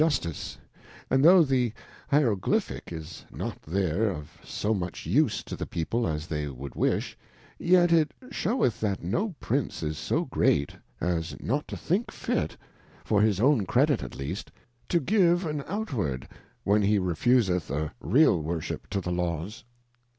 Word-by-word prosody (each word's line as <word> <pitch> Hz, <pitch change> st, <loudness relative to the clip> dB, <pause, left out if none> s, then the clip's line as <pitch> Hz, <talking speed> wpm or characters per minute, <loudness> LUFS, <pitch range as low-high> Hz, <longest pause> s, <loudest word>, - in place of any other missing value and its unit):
jJustice: 140 Hz, -, 0 dB, 0.5 s
and 130 Hz, +1 st, +4 dB
tho' 175 Hz, +2 st, +8 dB
the 130 Hz, -5 st, +1 dB, 0.4 s
Hierogly 120 Hz, -10 st, +3 dB
pfaick -, -, -8 dB
is 80 Hz, 0 st, -7 dB
not -, -, -5 dB
there 95 Hz, +4 st, 0 dB
of 75 Hz, -6 st, -6 dB
so 110 Hz, -, -1 dB
much 90 Hz, -4 st, -4 dB
use 115 Hz, -, +2 dB
to -, -, -6 dB
the -, -, -5 dB
People 115 Hz, +8 st, -1 dB
as 75 Hz, -1 st, -2 dB
they 75 Hz, -4 st, -3 dB
would 70 Hz, -1 st, -7 dB
wish, -, -, 0 dB, 0.4 s
yet 175 Hz, -1 st, +4 dB
it 155 Hz, -3 st, +4 dB, 0.2 s
sheweth 215 Hz, -, 0 dB
that 100 Hz, -5 st, -1 dB
no 175 Hz, -, -1 dB
Prince 130 Hz, -, -1 dB
is 75 Hz, -1 st, -2 dB
so^Great, 70 Hz, -1 st, +1 dB, 0.3 s
as 85 Hz, -1 st, -1 dB
not 145 Hz, +5 st, -1 dB
to -, -, -5 dB
think 195 Hz, +8 st, 0 dB
fit^for 105 Hz, -1 st, -3 dB
his 105 Hz, -3 st, +3 dB
own 120 Hz, -5 st, +3 dB
Credit -, -, +3 dB
at -, -, -7 dB
least, 75 Hz, +9 st, -5 dB, 0.4 s
to 170 Hz, -, +3 dB
give 175 Hz, +1 st, +3 dB
an 150 Hz, -3 st, -2 dB
outward, 120 Hz, -, -2 dB, 0.4 s
when 105 Hz, +1 st, +3 dB
he 105 Hz, +1 st, +3 dB
re 90 Hz, -3 st, 0 dB
fuseth 95 Hz, -4 st, +2 dB
a 75 Hz, +2 st, -2 dB
real_worship 85 Hz, -, +2 dB
to 100 Hz, 0 st, -1 dB
the 90 Hz, -, -3 dB
Laws. 90 Hz, -, -2 dB
105 Hz, 150 wpm, -27 LUFS, -, 0.5 s, tho